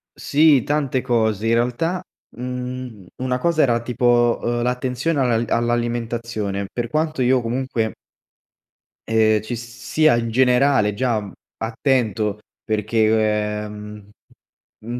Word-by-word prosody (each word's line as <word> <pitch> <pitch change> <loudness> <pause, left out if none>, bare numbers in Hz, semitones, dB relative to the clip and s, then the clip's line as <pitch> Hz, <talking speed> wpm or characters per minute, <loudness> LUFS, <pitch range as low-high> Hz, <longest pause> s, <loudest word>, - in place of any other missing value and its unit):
Sì, 145 -3 +4
tante 140 -3 0
cose, 110 -4 0
in 115 - +3
realtà, 125 +10 0 0.4
mhmm, 125 -4 -6
una 125 0 -1
cosa 160 +3 +1
era 120 -3 +3
tipo, 120 -1 +2
uhm, 120 0 -1
l’attenzione 125 +5 -1
alla 120 -3 +2
all’alimentazione, 115 -3 -2
per 120 -1 -3
quanto 155 0 -1
io 130 +1 +3
comunque 115 -2 -2 1.2
ehm, 110 -1 +3
ci 120 +3 -5
sia 120 +6 +1
in 115 -1 -2
generale 125 -2 +3
già 110 -4 -1 0.3
attento, 110 -3 0 0.2
perché, 110 -1 +1
ehm, 105 -1 -9 0.8
mhmm, 120 +2 -4
120 Hz, 110 wpm, -21 LUFS, 110-130 Hz, 1.2 s, Sì